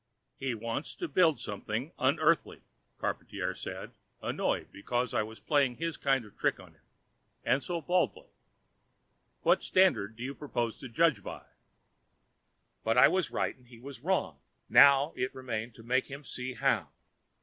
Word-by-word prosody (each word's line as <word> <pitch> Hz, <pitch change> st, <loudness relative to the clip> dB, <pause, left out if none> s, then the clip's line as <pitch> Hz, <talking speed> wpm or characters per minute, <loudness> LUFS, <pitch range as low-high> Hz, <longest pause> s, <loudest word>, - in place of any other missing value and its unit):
"He 130 Hz, -3 st, -1 dB
wants 115 Hz, +6 st, -4 dB
to 350 Hz, -, -4 dB
build 170 Hz, -, +3 dB
something 110 Hz, +8 st, -4 dB
unEarthly," 155 Hz, +5 st, +2 dB, 0.4 s
Charpantier -, -, -3 dB
said, -, -, -6 dB, 0.3 s
annoyed -, -, -1 dB
because 120 Hz, +5 st, -2 dB
I 115 Hz, -, +2 dB
was 110 Hz, +1 st, -7 dB
playing 140 Hz, -5 st, +2 dB
his 165 Hz, +1 st, -3 dB
kind 135 Hz, -4 st, +1 dB
of 105 Hz, -, -16 dB
trick -, -, 0 dB
on -, -, -14 dB
him, -, -, -30 dB, 0.6 s
and 125 Hz, +4 st, +2 dB
so 170 Hz, +3 st, -3 dB
baldly. 180 Hz, +4 st, 0 dB, 1.1 s
"What -, -, +4 dB
standards 110 Hz, -, +3 dB
do 120 Hz, -, -6 dB
you 135 Hz, +2 st, -3 dB
propose 120 Hz, -6 st, -3 dB
to 130 Hz, -, -8 dB
judge 165 Hz, +6 st, +3 dB
by?" -, -, -8 dB, 1.4 s
But 115 Hz, +2 st, +1 dB
I 125 Hz, -, +8 dB
was 185 Hz, -4 st, +1 dB
right -, -, -1 dB
and 125 Hz, -1 st, -24 dB
he 120 Hz, -1 st, -14 dB
was 130 Hz, +2 st, -10 dB
wrong. 150 Hz, -, 0 dB, 0.3 s
Now 140 Hz, +2 st, +7 dB
it 125 Hz, -, -2 dB
remained 115 Hz, -3 st, -4 dB
to 115 Hz, -, -13 dB
make 130 Hz, +2 st, +1 dB
him 140 Hz, +1 st, -8 dB
see 125 Hz, -1 st, -5 dB
how. 115 Hz, -, +1 dB
130 Hz, 160 wpm, -31 LUFS, 115-150 Hz, 1.4 s, I